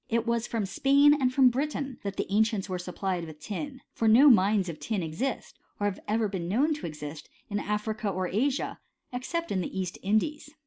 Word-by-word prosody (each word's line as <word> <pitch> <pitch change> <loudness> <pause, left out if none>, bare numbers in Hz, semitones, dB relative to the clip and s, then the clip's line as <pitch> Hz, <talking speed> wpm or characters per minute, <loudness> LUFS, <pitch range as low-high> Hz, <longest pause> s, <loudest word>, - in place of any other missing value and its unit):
It 230 0 +1
was 235 0 0
from 225 -3 -1
Spain 280 +8 +5
and 265 -4 +2
from 255 -1 +6
Britain 275 0 -3
that 200 -1 -5
the - - 0
ancients 215 -2 +2
were 185 -2 -3
supplied 180 0 -3
with 155 -2 -11
tin; 260 - -6
for 225 - 0
no 260 +6 +8
mines 200 -2 +3
of 165 -3 -6
tin 210 -5 -2
exist, 220 +12 -4 0.2
or 205 - 0
have 205 -2 -1
ever 220 +1 +1
been 190 -4 -4
known 270 - +2
to 300 - -5
exist, 150 -1 -8 0.2
in 205 - 0
Africa 210 +1 -2
or 185 -1 -1
Asia, 255 +9 -1 0.3
except 335 +7 -3
in 190 - +1
the 190 - -4
East 180 -2 -4
Indies. 220 +10 0
215 Hz, 205 wpm, -28 LUFS, 190-260 Hz, 0.3 s, no